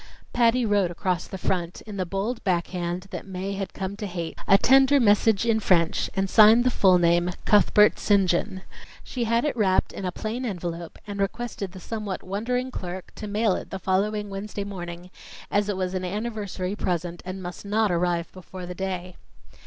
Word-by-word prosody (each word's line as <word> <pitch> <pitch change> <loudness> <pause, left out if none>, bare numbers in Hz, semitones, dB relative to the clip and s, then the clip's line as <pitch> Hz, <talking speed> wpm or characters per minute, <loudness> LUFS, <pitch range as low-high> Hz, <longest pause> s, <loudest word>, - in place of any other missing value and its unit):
Patty 240 0 +3
wrote 205 -4 +2
across 180 0 -2
the 190 - -6
front, 175 -2 -2
in 210 -2 -8
the 185 -2 -2
bold 205 +6 -3
back 175 -3 +1
hand 175 0 -3
that - - -6
Mae 190 +1 -4
had 195 -1 -4
come 190 +1 -4
to 210 -1 -4
hate, 170 -3 -5
a 195 - +7
tender 270 +5 +5
message 215 -1 +3
in 225 -1 +2
French, 170 -5 +2
and 195 0 +1
signed 220 +4 +7
the 255 - +2
full 190 -5 +5
name, 175 0 +3 0.2
"Cuthbert 210 0 +5
St. 200 -2 +3
John." 190 +2 -1 0.4
She 245 -2 -3
had 230 +4 +1
it 295 - 0
wrapped 195 -5 +2
in - - -6
a 180 - -1
plain 220 +7 -4
envelope 175 -6 -5
and 205 -1 -6
requested 200 -1 -3
the 190 - -9
somewhat 210 0 -5
wondering 245 +7 -2
clerk 185 -4 -6
to 210 - -7
mail 210 0 +1
it - - -5
the 195 - -4
following 205 +2 -1
Wednesday 200 +1 -5
morning, 175 -2 -7 0.4
as 205 0 +1
it 200 - -1
was 185 -1 -2
an 185 -1 -2
anniversary 205 -1 -3
present 175 -3 -2
and 185 +1 -6
must 175 0 -7
not 210 0 +1
arrive 175 -1 0
before 185 0 -9
the 180 - -6
day. 185 -1 -4
195 Hz, 190 wpm, -25 LUFS, 180-215 Hz, 0.4 s, a